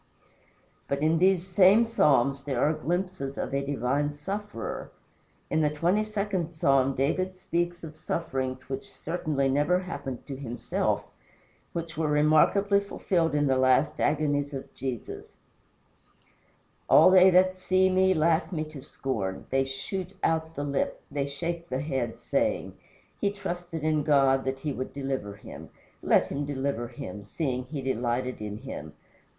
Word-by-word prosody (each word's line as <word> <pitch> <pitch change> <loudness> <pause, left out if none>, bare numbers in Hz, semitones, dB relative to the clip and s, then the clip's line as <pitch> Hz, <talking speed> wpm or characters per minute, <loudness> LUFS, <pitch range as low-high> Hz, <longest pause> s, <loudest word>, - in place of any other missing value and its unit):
But 140 +1 -1
in 160 +1 +3
these 185 -1 +3
same 190 +4 +5
Psalms 140 - +3
there 135 -4 -1
are 150 - +3
glimpses 170 -2 -3
of - - -3
a 140 0 0
divine 140 +1 0
sufferer. 195 - -5 0.6
In 160 - +1
the 150 - +3
twenty 175 +8 +1
second 200 -5 -2
Psalm 135 -4 +2
David 185 +8 0
speaks 175 -1 -2
of 155 -1 -8
sufferings 130 -5 -3
which 135 0 -6
certainly 155 -4 -1
never 145 +6 +2
happened 140 -8 -6
to 140 - -6
himself 120 -3 -2 0.7
which 170 -1 -5
were 160 - +1
remarkably 155 +7 +4
fulfilled 175 -5 0
in 145 0 +2
the 130 -2 +2
last 130 +3 +3
agonies 145 -1 +1
of 135 - -8
Jesus: 130 -4 -6 1.5
"All - - +8
they 185 0 +8
that 185 +1 +4
see 185 +1 +3
me 190 0 +3
laugh 160 +1 +2
me 155 -4 -1
to 140 - -9
scorn. 110 -8 -4
They 135 0 +2
shoot 185 +8 -5
out 160 0 0
the 145 - -3
lip, 140 -1 -1
they 140 -1 -1
shake 170 +4 -4
the 130 +1 -1
head, 130 -6 -2
saying, - - -1 0.5
He 200 - +2
trusted 175 -5 -5
in 155 -1 +2
God 135 -2 +3
that 135 0 -1
he 150 -1 -2
would 130 0 -5
deliver 135 -7 -3
him. - - -11 0.3
Let - - +3
him 140 +1 -2
deliver 140 -4 -2
him, 120 -5 -8
seeing 125 +2 -3
he 140 0 -5
delighted 125 -1 -1
in 105 -1 -5
him. 95 - -8
145 Hz, 150 wpm, -27 LUFS, 135-175 Hz, 1.5 s, All